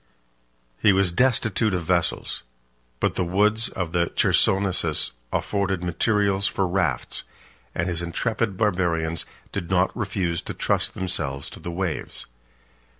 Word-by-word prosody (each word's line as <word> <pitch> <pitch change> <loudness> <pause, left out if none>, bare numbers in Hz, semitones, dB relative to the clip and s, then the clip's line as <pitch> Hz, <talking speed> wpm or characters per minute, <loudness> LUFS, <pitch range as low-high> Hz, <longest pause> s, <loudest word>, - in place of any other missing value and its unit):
He 105 - +5
was 95 -2 +3
destitute 110 -2 +2
of 90 - -2
vessels; 85 0 0 0.6
but - - +1
the - - 0
woods 105 +6 +2
of 90 -3 -3
the 85 0 +2
Chersonesus 95 -5 +2 0.2
afforded 95 -3 0
materials 100 +3 +2
for 100 -3 0
rafts, 90 -8 0 0.5
and 85 - 0
his 85 -2 -1
intrepid 100 +4 -1
Barbarians 85 -6 0 0.2
did 85 - -4
not 95 0 +2
refuse 95 -7 -1
to - - -6
trust - - 0
themselves 75 -7 -2
to - - -9
the - - -6
waves. 85 -1 -3
95 Hz, 130 wpm, -24 LUFS, 85-100 Hz, 0.6 s, He